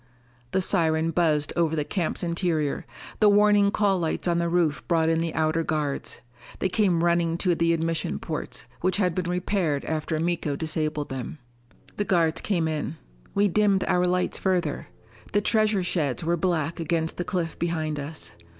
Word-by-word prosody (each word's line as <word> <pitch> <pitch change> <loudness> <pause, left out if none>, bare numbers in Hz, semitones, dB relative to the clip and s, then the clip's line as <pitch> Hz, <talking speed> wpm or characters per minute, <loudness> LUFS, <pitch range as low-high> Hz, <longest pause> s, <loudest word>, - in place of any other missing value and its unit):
The 190 +8 +1
siren 160 -1 +2
buzzed 155 -3 +1
over 165 -2 +1
the 150 - 0
camp's 175 +2 -2
interior; 170 -6 -1 0.3
the 210 - +6
warning 205 0 +5
call 200 -2 +2
lights 165 +1 -2
on 170 -1 +2
the 170 0 0
roof 170 -4 +1
brought 165 -2 +2
in 165 0 +2
the 165 -1 -2
outer 160 +1 +1
guards. 150 -3 -2 0.4
They 190 - 0
came 180 -4 +2
running 170 -1 +2
to 180 0 +2
the 165 0 +2
admission 165 - -1
ports, - - -5
which 185 +1 +1
had 180 -4 +1
been 175 0 -2
repaired 180 -5 0
after 155 0 -2
Miko 165 -3 -1
disabled 155 -1 -2
them. 135 +3 -5 0.6
The 205 - 0
guards 165 -4 +1
came 170 -6 0
in. 155 0 -3 0.4
We 205 +1 +4
dimmed 200 0 +2
our 180 0 +2
lights 180 0 0
further. 180 -6 -1 0.5
The 205 - +3
treasure 215 -2 +2
sheds 160 -5 -1
were 170 +1 +1
black 170 -2 -1
against 160 0 -1
the 175 - -1
cliff 175 -3 -3
behind 155 -3 -1
us. 150 +2 -6
170 Hz, 170 wpm, -25 LUFS, 160-180 Hz, 0.6 s, the